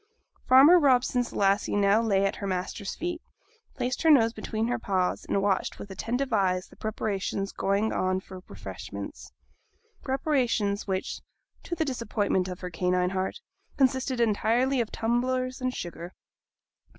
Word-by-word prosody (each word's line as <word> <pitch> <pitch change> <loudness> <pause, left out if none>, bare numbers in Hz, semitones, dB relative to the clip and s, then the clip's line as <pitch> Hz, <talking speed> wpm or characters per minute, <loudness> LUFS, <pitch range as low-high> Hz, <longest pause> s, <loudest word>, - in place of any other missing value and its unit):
Farmer 285 +8 +8
Robson's 250 -4 +2
Lassie 200 +1 +1
now 205 +2 +4
lay 200 -4 +2
down 200 - +3
at - - -6
her 200 - -4
master's 190 +2 -3
feet, 345 0 -4 0.5
placed 250 0 -2
her 325 - +4
nose 230 -7 +5
between 220 -1 -3
her 245 0 -1
paws, 185 -4 -1
and 195 - 0
watched 200 -2 0
with 200 - -9
attentive 245 +7 -2
eyes 185 -3 +1
the - - -18
preparations 200 -2 -3
going 200 +3 0
on 185 0 0
for 190 -1 -11
refreshments - - -8 0.7
preparations 250 -8 0
which, 190 -1 -3 0.4
to 345 - -4
the 320 - 0
disappointment 210 -7 -1
of 180 -1 -7
her 180 -1 -5
canine 180 +1 +1
heart, 190 - -3 0.4
consisted 260 -1 +1
entirely 235 +4 +2
of 225 - -4
tumblers 255 +3 -1
and 255 0 -1
sugar. 175 +1 -7
220 Hz, 150 wpm, -27 LUFS, 195-255 Hz, 0.7 s, Farmer